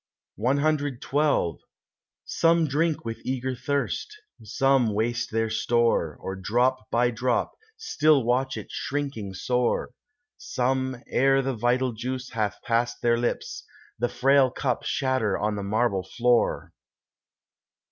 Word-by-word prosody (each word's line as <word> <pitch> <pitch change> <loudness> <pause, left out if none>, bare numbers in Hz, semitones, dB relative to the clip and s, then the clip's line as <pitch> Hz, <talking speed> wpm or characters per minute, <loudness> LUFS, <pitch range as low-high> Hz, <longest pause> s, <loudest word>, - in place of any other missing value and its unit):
CXII 140 - +1 0.7
Some 165 0 +3
drink 155 +1 0
with 115 0 -5
eager 130 0 -2
thirst; 140 - -3 0.2
some 125 0 +2
waste 120 +2 -1
their 115 0 -1
store, 110 -8 +1
Or 95 - -5
drop 120 +4 0
by 120 +1 +2
drop 120 +1 0 0.3
still 155 - +2
watch 130 +3 0
it - - -8
shrinking 135 -9 -4
sore; 125 +4 0 0.5
Some, 130 -6 -1
ere 135 +1 +2
the 135 +1 -1
vital 125 +2 +1
juice 125 +3 -5
hath 105 -3 -2
passed 120 +1 -1
their 115 -1 +3
lips, 120 - -3 0.4
The 120 +1 +1
frail 135 0 +4
cup 125 -1 -2
shatter 130 -7 0
on 105 0 -1
the 100 - -4
marble 100 0 0
floor. 120 +5 0
125 Hz, 120 wpm, -26 LUFS, 115-135 Hz, 0.7 s, frail